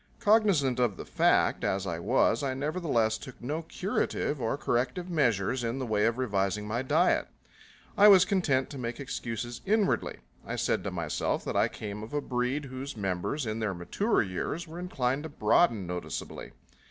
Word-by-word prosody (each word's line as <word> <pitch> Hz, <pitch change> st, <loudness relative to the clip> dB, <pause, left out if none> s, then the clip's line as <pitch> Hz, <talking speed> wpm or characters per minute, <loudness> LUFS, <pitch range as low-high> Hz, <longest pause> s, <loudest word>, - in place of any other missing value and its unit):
Cognizant 195 Hz, -, +3 dB
of 120 Hz, -6 st, +1 dB
the -, -, -7 dB
fact, -, -, +2 dB
as 95 Hz, 0 st, 0 dB
I 85 Hz, -3 st, -3 dB
was, 120 Hz, -, +2 dB
I 135 Hz, -2 st, -1 dB
nevertheless 135 Hz, -7 st, 0 dB
took 130 Hz, -, -10 dB
no 150 Hz, +7 st, -3 dB
curative 160 Hz, -4 st, -2 dB
or 115 Hz, +4 st, 0 dB
corrective 135 Hz, +8 st, -1 dB
measures 120 Hz, -, +1 dB
in 115 Hz, +2 st, -2 dB
the 130 Hz, -, -3 dB
way 110 Hz, -1 st, +2 dB
of 115 Hz, +1 st, 0 dB
revising 105 Hz, -4 st, 0 dB
my 115 Hz, +3 st, -1 dB
diet. 130 Hz, -, +2 dB, 0.7 s
I 205 Hz, -, +7 dB
was 190 Hz, -3 st, +8 dB
content 155 Hz, -10 st, +1 dB
to 140 Hz, -, -7 dB
make 120 Hz, 0 st, -4 dB
excuses 120 Hz, -3 st, -5 dB
inwardly. 210 Hz, 0 st, +1 dB, 0.3 s
I -, -, -4 dB
said -, -, 0 dB
to -, -, 0 dB
myself 85 Hz, -4 st, -2 dB
that -, -, -3 dB
I -, -, +4 dB
came 105 Hz, -1 st, -7 dB
of 110 Hz, +6 st, -7 dB
a -, -, +2 dB
breed 125 Hz, +3 st, -1 dB
whose 130 Hz, 0 st, -7 dB
members 95 Hz, -, -2 dB
in 110 Hz, 0 st, -3 dB
their 105 Hz, -4 st, -1 dB
mature 200 Hz, -, 0 dB
years 105 Hz, -, -4 dB
were 165 Hz, +2 st, -8 dB
inclined 135 Hz, -7 st, -1 dB
to 160 Hz, -, -6 dB
broaden 115 Hz, -, +2 dB
noticeably. 90 Hz, 0 st, -6 dB
125 Hz, 175 wpm, -29 LUFS, 110-150 Hz, 0.7 s, was